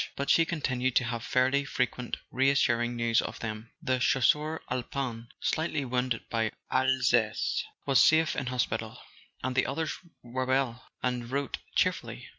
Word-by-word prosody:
but 140 Hz, -, 0 dB
she 165 Hz, -, +5 dB
continued 130 Hz, -6 st, -1 dB
to -, -, +5 dB
have 115 Hz, -1 st, -3 dB
fairly 130 Hz, +3 st, +2 dB
frequent 125 Hz, -3 st, -2 dB
reassuring 120 Hz, -3 st, +2 dB
news 115 Hz, -1 st, +2 dB
of -, -, -6 dB
them. 110 Hz, 0 st, -5 dB
The 130 Hz, 0 st, +1 dB
Chasseur 150 Hz, +5 st, +2 dB
Alpin, 125 Hz, -2 st, -3 dB
slightly 155 Hz, -3 st, -1 dB
wounded 125 Hz, -1 st, -1 dB
in 115 Hz, -1 st, +1 dB, 0.2 s
Alsace, 130 Hz, -4 st, +2 dB, 0.2 s
was 135 Hz, -2 st, +5 dB
safe 160 Hz, 0 st, +4 dB
in 135 Hz, -, -2 dB
hospital; 125 Hz, -2 st, -2 dB, 0.5 s
and 130 Hz, 0 st, -1 dB
the 130 Hz, -, +2 dB
others 155 Hz, +4 st, -2 dB, 0.3 s
were 130 Hz, +2 st, -3 dB
well, 130 Hz, -2 st, 0 dB, 0.2 s
and 125 Hz, -2 st, -1 dB
wrote 140 Hz, 0 st, -2 dB, 0.2 s
cheer¬ -, -, +4 dB
fully. -, -, -9 dB
130 Hz, 150 wpm, -29 LUFS, 120-135 Hz, 0.5 s, she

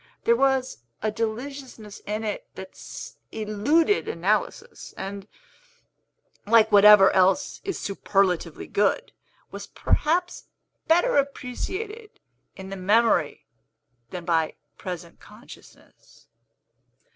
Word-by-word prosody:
There 235 Hz, -, +4 dB
was 265 Hz, -, +1 dB, 0.2 s
a 215 Hz, -, 0 dB
deliciousness 230 Hz, 0 st, -6 dB
in 215 Hz, +2 st, -3 dB
it 360 Hz, -, -4 dB
that -, -, -9 dB, 0.6 s
eluded 225 Hz, -, +1 dB
analysis, 195 Hz, +6 st, -2 dB
and 195 Hz, +1 st, -6 dB, 1.2 s
like 220 Hz, 0 st, +5 dB
whatever 205 Hz, -1 st, +8 dB
else 190 Hz, +9 st, +2 dB
is 390 Hz, -, -4 dB
superlatively 190 Hz, -4 st, -1 dB
good 205 Hz, 0 st, 0 dB, 0.4 s
was -, -, -8 dB
perhaps 350 Hz, +4 st, -1 dB, 0.4 s
better 350 Hz, +10 st, +3 dB
appreciated 380 Hz, -, -4 dB, 0.4 s
in 190 Hz, 0 st, -9 dB
the 195 Hz, -, -5 dB
memory 200 Hz, -4 st, +2 dB, 0.6 s
than 175 Hz, -2 st, -7 dB
by 165 Hz, -2 st, 0 dB, 0.2 s
present 175 Hz, -2 st, -8 dB
consciousness. -, -, -17 dB
215 Hz, 95 wpm, -25 LUFS, 195-275 Hz, 1.2 s, whatever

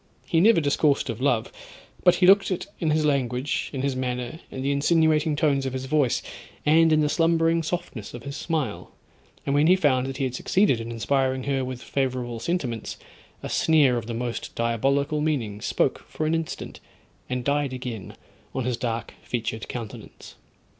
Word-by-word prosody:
He 165 Hz, -, +2 dB
never 215 Hz, +2 st, +6 dB
discoursed 145 Hz, -3 st, +2 dB
of 115 Hz, +2 st, -7 dB
love, 125 Hz, -5 st, +1 dB, 0.5 s
but 180 Hz, -, +6 dB
he 180 Hz, -, +3 dB
looked 195 Hz, +2 st, +6 dB
it 185 Hz, -, -2 dB
in 160 Hz, -, 0 dB
his 155 Hz, 0 st, +2 dB
language, 130 Hz, -2 st, 0 dB
in 135 Hz, -2 st, -4 dB
his 140 Hz, -2 st, 0 dB
manner, 125 Hz, +2 st, -3 dB
in 130 Hz, -, -6 dB
the 140 Hz, -, +1 dB
insinuating 155 Hz, +1 st, +3 dB
tones 145 Hz, -2 st, +2 dB
of 130 Hz, -, -4 dB
his 130 Hz, 0 st, -4 dB
voice, 140 Hz, -3 st, +1 dB, 0.4 s
and 160 Hz, +2 st, +5 dB
in 155 Hz, 0 st, +4 dB
the 150 Hz, -, +2 dB
slumbering 165 Hz, +1 st, +2 dB
softness 160 Hz, -, -5 dB
of 120 Hz, -, -9 dB
his 140 Hz, +1 st, -6 dB
smile, 155 Hz, -12 st, -3 dB, 0.5 s
and 140 Hz, -, 0 dB
when 145 Hz, +2 st, +4 dB
he 180 Hz, -, +7 dB
found 135 Hz, -7 st, +2 dB
that 135 Hz, 0 st, -5 dB
he 135 Hz, -, -1 dB
had 130 Hz, -2 st, -1 dB
succeeded 160 Hz, -, +2 dB
in 115 Hz, -, -6 dB
inspiring 130 Hz, +3 st, 0 dB
her 135 Hz, -1 st, 0 dB
with 130 Hz, -1 st, -6 dB
favourable 125 Hz, -3 st, -2 dB
sentiments, 125 Hz, -, -3 dB, 0.5 s
a -, -, -3 dB
sneer 150 Hz, -6 st, +4 dB
of 115 Hz, -2 st, -3 dB
the 115 Hz, -, -4 dB
most 120 Hz, 0 st, -4 dB
diabolical 140 Hz, +6 st, +1 dB
meaning 120 Hz, -10 st, -1 dB
spoke -, -, 0 dB
for 155 Hz, -, -3 dB
an 155 Hz, -, +1 dB
instant, 165 Hz, -1 st, -4 dB, 0.5 s
and 125 Hz, -1 st, -2 dB
died 145 Hz, 0 st, 0 dB
again 125 Hz, -6 st, -6 dB, 0.4 s
on 130 Hz, -, -1 dB
his 125 Hz, -2 st, -1 dB
dark 115 Hz, -2 st, -3 dB
featured 110 Hz, -2 st, -4 dB
countenance. 115 Hz, -4 st, -8 dB
135 Hz, 180 wpm, -25 LUFS, 125-155 Hz, 0.5 s, he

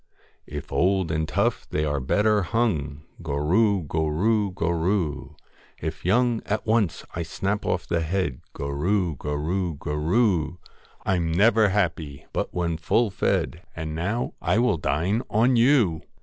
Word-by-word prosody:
If 75 Hz, -1 st, -7 dB
old 95 Hz, -2 st, +2 dB
and 80 Hz, -1 st, -1 dB
tough, -, -, 0 dB
they 75 Hz, 0 st, 0 dB
are 70 Hz, -1 st, 0 dB
better 105 Hz, +10 st, +2 dB
hung, 85 Hz, -, -1 dB, 0.2 s
Gorroo! 85 Hz, +7 st, +2 dB
gorroo! 85 Hz, +8 st, +1 dB
gorroo! 85 Hz, -3 st, -1 dB, 0.4 s
If 80 Hz, +1 st, -5 dB
young, 120 Hz, +4 st, +2 dB
at 105 Hz, +1 st, -1 dB
once 110 Hz, -5 st, +1 dB
I 85 Hz, -, -3 dB
snap 100 Hz, +5 st, -2 dB
off 90 Hz, -, 0 dB
the 85 Hz, -, 0 dB
head, 80 Hz, -5 st, -1 dB
Gorroo! 85 Hz, +5 st, 0 dB
gorroo! 80 Hz, +4 st, -2 dB
gorroo! 85 Hz, +4 st, +1 dB, 0.5 s
I 95 Hz, -, +2 dB
'm 85 Hz, -2 st, -1 dB
never 105 Hz, +4 st, +4 dB
happy 80 Hz, -8 st, -1 dB
but -, -, -2 dB
when 85 Hz, -2 st, -1 dB
full 110 Hz, +7 st, +1 dB
fed, 85 Hz, -3 st, 0 dB
And 80 Hz, -1 st, -4 dB
now 95 Hz, +9 st, -2 dB
I -, -, +1 dB
will 120 Hz, -6 st, +3 dB
dine 85 Hz, -, 0 dB
on 120 Hz, +4 st, +3 dB
you 115 Hz, -, +4 dB
90 Hz, 140 wpm, -25 LUFS, 80-105 Hz, 0.5 s, never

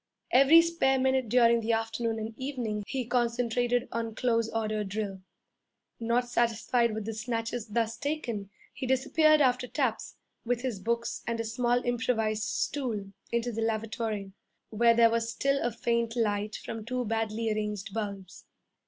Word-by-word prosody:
Every 275 Hz, +6 st, +7 dB
spare 335 Hz, -6 st, +2 dB
minute 260 Hz, -2 st, +1 dB
during 235 Hz, 0 st, +5 dB
the 225 Hz, +1 st, 0 dB
afternoon 225 Hz, 0 st, -1 dB
and 220 Hz, +1 st, -5 dB
evening 245 Hz, -6 st, -3 dB
he 260 Hz, -3 st, -2 dB
concentrated 245 Hz, 0 st, +1 dB
on 230 Hz, -1 st, -3 dB
close 230 Hz, -2 st, +1 dB
order 215 Hz, -1 st, -1 dB
drill. 200 Hz, -1 st, -4 dB, 0.8 s
Not 235 Hz, +2 st, +1 dB
satisfied 235 Hz, -1 st, +1 dB
with 220 Hz, -2 st, -4 dB
the 225 Hz, -, -3 dB
snatches 230 Hz, +1 st, -3 dB
thus 225 Hz, +1 st, -1 dB
taken, 240 Hz, -9 st, -3 dB, 0.2 s
he 265 Hz, -, -5 dB
disappeared 305 Hz, +4 st, +4 dB
after 250 Hz, -2 st, +2 dB
taps, 250 Hz, -5 st, -2 dB, 0.3 s
with 245 Hz, 0 st, -1 dB
his 245 Hz, -6 st, -3 dB
books 235 Hz, +3 st, -2 dB
and 230 Hz, -1 st, -1 dB
a -, -, 0 dB
small 240 Hz, +2 st, +1 dB
improvised 225 Hz, -3 st, 0 dB
stool, 215 Hz, -2 st, -2 dB, 0.2 s
into 235 Hz, +1 st, 0 dB
the 225 Hz, 0 st, -3 dB
lavatory, 220 Hz, -2 st, -2 dB, 0.4 s
where 230 Hz, +2 st, +4 dB
there 230 Hz, -1 st, +6 dB
was 230 Hz, 0 st, 0 dB
still 275 Hz, +3 st, 0 dB
a 240 Hz, -, +1 dB
faint 235 Hz, 0 st, -1 dB
light 210 Hz, -2 st, 0 dB
from 225 Hz, -1 st, -6 dB
two 250 Hz, +2 st, -2 dB
badly 225 Hz, 0 st, -1 dB
arranged 210 Hz, -2 st, -3 dB
bulbs. 200 Hz, -4 st, -5 dB
230 Hz, 155 wpm, -29 LUFS, 220-245 Hz, 0.8 s, Every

